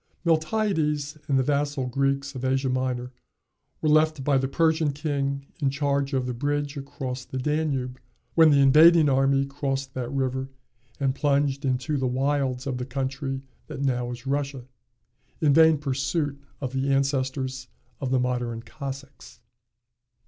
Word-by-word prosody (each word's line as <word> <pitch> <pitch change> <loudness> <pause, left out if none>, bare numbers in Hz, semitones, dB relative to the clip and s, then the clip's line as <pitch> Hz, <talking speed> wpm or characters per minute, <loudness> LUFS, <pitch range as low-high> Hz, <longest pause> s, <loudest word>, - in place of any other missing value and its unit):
Miltiades 155 -4 +1
and 135 - +2
the 130 - +3
vassal 145 -1 0
Greeks 140 +2 0
of 130 -1 -7
Asia 130 0 +1
Minor 125 -1 -1 0.7
were 155 - +3
left 155 -2 +3
by 140 0 +2
the 135 - 0
Persian 160 0 +2
king 140 -2 -2 0.2
in 140 - +3
charge 140 0 0
of 130 -1 +1
the 125 - -2
bridge 145 +3 -2
across 135 -2 -5
the 130 - -7
Danube, 135 -3 -1 0.3
when 160 -1 +7
the 140 -2 +5
invading 155 +3 +7
army 135 0 +3
crossed 135 -1 -3
that 125 -2 -4
river, 130 -1 -1 0.5
and 135 -2 +1
plunged 140 0 +1
into 130 +3 0
the 130 -1 0
wilds 130 0 0
of 130 -2 -2
the 125 - -3
country 135 +1 -3 0.2
that 140 -3 -5
now 125 -3 0
is 120 +1 -7
Russia, 140 -2 -2 0.7
in 150 -3 +3
vain 160 0 +6
pursuit 140 +1 -2 0.2
of 130 -2 -3
the 135 +1 0
ancestors 130 -1 -1 0.3
of 135 - -2
the 130 0 +2
modern 120 -2 -2
Cossacks. 135 +1 -9
135 Hz, 150 wpm, -25 LUFS, 130-145 Hz, 0.7 s, when